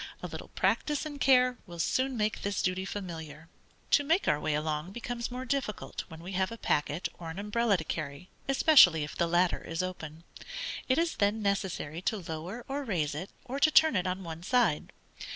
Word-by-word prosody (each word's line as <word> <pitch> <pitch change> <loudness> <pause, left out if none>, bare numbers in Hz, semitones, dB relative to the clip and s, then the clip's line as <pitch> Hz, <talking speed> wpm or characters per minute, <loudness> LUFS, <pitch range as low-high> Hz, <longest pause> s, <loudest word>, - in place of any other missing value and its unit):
A - - -2
little - - -8
practice 300 0 0
and 290 -2 -7
care 250 -2 +5
will 175 -1 -9
soon 260 +9 0
make 215 0 0
this 200 0 -1
duty 185 +1 0
familiar. 165 -5 -7 0.4
To 285 - +5
make 325 +7 +2
our 150 - +3
way 155 -1 0
along, 155 +4 -2
becomes 240 0 -4
more 255 +1 -5
difficult 260 -5 -3
when 160 0 -11
we 185 - -6
have 190 +1 0
a 230 - -6
packet 150 -3 0
or 165 -2 -6
an 160 - -7
umbrella 210 +1 +1
to 160 - -4
carry, 155 +1 -5 0.2
especially 265 - +7
if 150 - -6
the 170 - +1
latter 175 +1 +2
is 165 +2 -3
open. 165 -3 -6 0.7
It 260 - +4
is 335 0 +1
then 210 +2 +1
necessary 190 -5 -1
to 215 - 0
lower 175 +6 -6
or 280 +1 -3
raise 170 - -1
it, 165 +6 -5 0.2
or 265 +2 -4
to 310 - +5
turn 315 -3 +5
it 185 -1 +1
on 185 +1 -2
one 165 -1 -7
side. 210 -6 +1
190 Hz, 200 wpm, -30 LUFS, 165-245 Hz, 0.7 s, especially